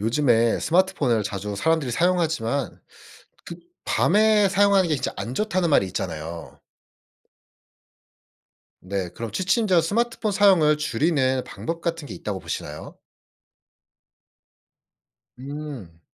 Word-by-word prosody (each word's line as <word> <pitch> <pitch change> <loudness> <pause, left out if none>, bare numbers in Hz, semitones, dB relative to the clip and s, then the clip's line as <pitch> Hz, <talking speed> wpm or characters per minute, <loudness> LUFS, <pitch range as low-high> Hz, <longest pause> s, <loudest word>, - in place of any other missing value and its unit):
요즘에 115 0 +2
스마트폰을 160 - +1
자주 100 0 -4
사람들이 160 +2 0
사용하지만 155 -5 0 0.7
그 170 - -7 0.3
"밤에 210 +1 +3
사용하는 200 -1 +3
게 155 - +2
진짜 135 - -3
안 120 - -5
좋다."는 185 0 0
말이 140 -9 +4
있잖아요. 80 -1 -6 2.2
네. 95 -1 -4
그럼 115 +3 -7
취침 200 +5 +1
전 180 -4 +4
스마트폰 220 +4 -1
사용을 185 -7 +4
줄이는 130 -2 0
방법 165 +1 -6
같은 165 -3 -3
게 - - -8
있다고 100 -3 -5
보시나요? 75 -4 -7 2.4
음. 135 - -8
150 Hz, 255 characters per minute, -23 LUFS, 115-185 Hz, 2.4 s, 말이